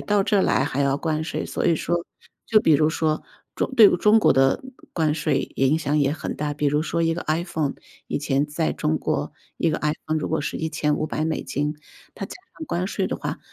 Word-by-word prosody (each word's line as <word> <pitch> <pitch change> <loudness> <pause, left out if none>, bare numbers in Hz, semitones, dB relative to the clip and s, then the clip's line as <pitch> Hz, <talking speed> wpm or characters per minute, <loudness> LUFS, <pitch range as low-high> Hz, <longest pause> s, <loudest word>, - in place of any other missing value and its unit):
到 205 -1 +2
这 200 -1 +2
来 - - +2
还 140 0 -2
要 140 0 +2
关 155 +1 -1
税， 160 - -3
所 - - -3
以 165 - +4
说， 170 +2 -1 0.4
就 220 - +5
比 160 - +4
如 155 +2 +4
说， 155 -1 0 0.3
中 - - -2
对 215 -3 +9
中 210 +5 +5
国 - - +5
的 135 - +3 0.3
关 155 -3 +1
税 150 -3 0
也 135 0 +2
影 155 +3 +2
响 145 -1 -1
也 140 -1 +2
很 155 - -4
大， 150 0 -2
比 145 0 -1
如 150 +2 +2
说 170 +1 -1
一 165 0 +2
个 175 - -4
IPhone， 155 -2 -1 0.3
以 - - -1
前 140 -1 +1
在 155 +2 -1
中 80 - -1
国， - - -2 0.3
一 165 - +2
个 155 - -1
IPhone 155 +1 -1
如 - - -3
果 160 - 0
是 150 - -3
$1500， 155 -1 -1 0.4
它 - - -5
加 - - -9 0.2
上 320 - -5
关 180 +2 -1
税 - - -1
的 - - -3
话， - - -4
155 Hz, 270 characters per minute, -23 LUFS, 145-165 Hz, 0.4 s, 对